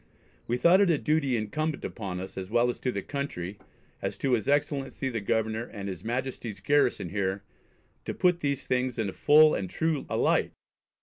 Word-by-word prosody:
We 120 - 0
thought 175 +8 +5
it 200 - +4
a 165 - +4
duty 140 -4 +1
incumbent 150 +8 -2
on 95 -4 -3
us, 95 +1 -7
as 95 -1 -5
well 120 +2 +2
to 125 - -3
the 100 -4 -4
Country, 105 -10 -4 0.4
as - - -3
to 135 -2 0
his 115 +1 +1
Excellency 140 -2 0
the 115 -4 -3
Governor, 110 +2 0
and 100 -4 -7
his 95 -2 -6
Majesty's 120 -2 -3
garrison 145 - +2
here 95 +1 -2 0.6
to - - -4
put 180 -2 +3
these 140 -3 -2
things 125 -1 0
in 110 -3 -1
a - - -7
full 155 +1 +6
and 95 -2 -2
true 160 - -1
a - - -1
light - - +2
125 Hz, 190 wpm, -28 LUFS, 100-145 Hz, 0.6 s, full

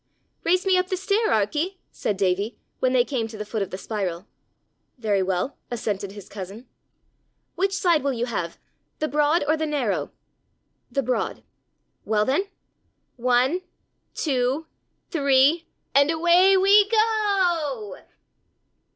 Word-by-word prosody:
"Race 365 +2 +2
me 375 -1 +4
up 365 - -1
the 370 - -2
stair, 405 +4 +1
Arkie," 300 - 0
said 205 - -2
Davie, 195 +3 0 0.2
when 255 - +2
they 250 -1 +3
came 245 -5 -2
to 220 -1 -10
the 210 - -5
foot 215 0 -3
of 195 - -2
the 185 - -5
spiral. 190 -4 -4 0.7
"Very 210 -5 +1
well," 185 +7 -2
assented 205 -4 -3
his 205 -2 -11
cousin. 200 +5 -8 0.9
"Which 390 +2 0
side 350 -5 +2
will 280 +1 0
you 240 0 -1
have 175 -8 -4 0.4
the 310 - -1
broad 300 +2 +2
or 310 - +3
the 315 0 -2
narrow?" 215 - -1 0.8
"The 275 - 0
broad." 250 +1 -2 0.6
"Well 215 -1 +1
then 285 - +1 0.7
one, 255 +7 +2 0.5
two, 270 +1 0 0.5
three, 285 +1 +3 0.3
and 280 +2 +5
away 345 +4 +5
we 400 +2 +5
go!" 375 - +1
270 Hz, 135 wpm, -24 LUFS, 215-345 Hz, 0.9 s, and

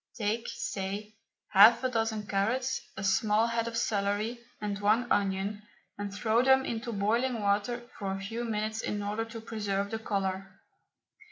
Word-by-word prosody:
Take, 220 +2 -1
say, 200 +2 -4 0.4
half 215 +5 +7
a 255 - +2
dozen 225 -3 -1
carrots, 230 +7 0 0.2
a 195 - -4
small 210 +2 +3
head 230 0 -1
of 230 0 -3
celery, 210 +1 0 0.2
and 205 -1 -3
one 215 +4 +3
onion, 200 +1 0 0.3
and 205 0 -5
throw 220 +3 +2
them 265 +1 +5
into 235 +1 -3
boiling 230 +4 +1
water 210 +4 0
for 195 -2 -2
a 195 - -3
few 225 +5 -4
minutes 220 -1 -2
in 205 0 -2
order 210 +2 -2
to 225 0 -8
preserve 205 -3 -2
the 225 - -2
colour. 195 -3 -3
215 Hz, 160 wpm, -30 LUFS, 200-230 Hz, 0.4 s, half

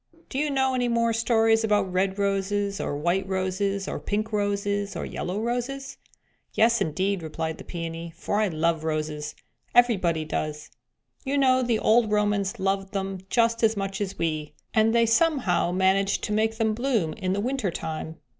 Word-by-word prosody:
"Do 265 - -3
you 300 0 +1
know 265 -1 +1
any 250 -1 +1
more 230 -1 +2
stories 225 0 +3
about 205 -4 +1
red 190 +1 +1
roses, 200 0 0
or 145 - -2
white 175 +5 0
roses, 190 +1 -1
or - - -3
pink 215 +2 -2
roses, 205 0 -1
or - - -3
yellow 185 +3 -4
roses?" 245 +4 -3 0.6
"Yes, 235 +2 +4
indeed," 190 +4 0
replied 160 0 -4
the - - -8
Peony, 165 -1 -6
"for 205 - -2
I 215 - +3
love 165 -1 0
roses; 155 -1 -3 0.4
everybody 185 -10 +3
does. 150 0 -4 0.5
You 280 0 -1
know 260 -2 +4
the 240 -3 +1
old 220 0 +3
Romans 205 -2 +1
loved 195 +1 -1
them 195 -1 -3
just 230 0 +2
as 225 -2 +3
much 195 0 -3
as 195 -1 -3
we, 155 -2 -2 0.2
and 220 +1 +3
they 235 0 +5
somehow 230 - +2
managed 190 +2 +2
to 210 - -1
make 220 +1 +1
them 220 -1 +1
bloom 225 -9 0
in 185 -4 -2
the 200 - -1
winter 245 -1 -1
time. 160 -1 -5
200 Hz, 175 wpm, -26 LUFS, 185-225 Hz, 0.6 s, they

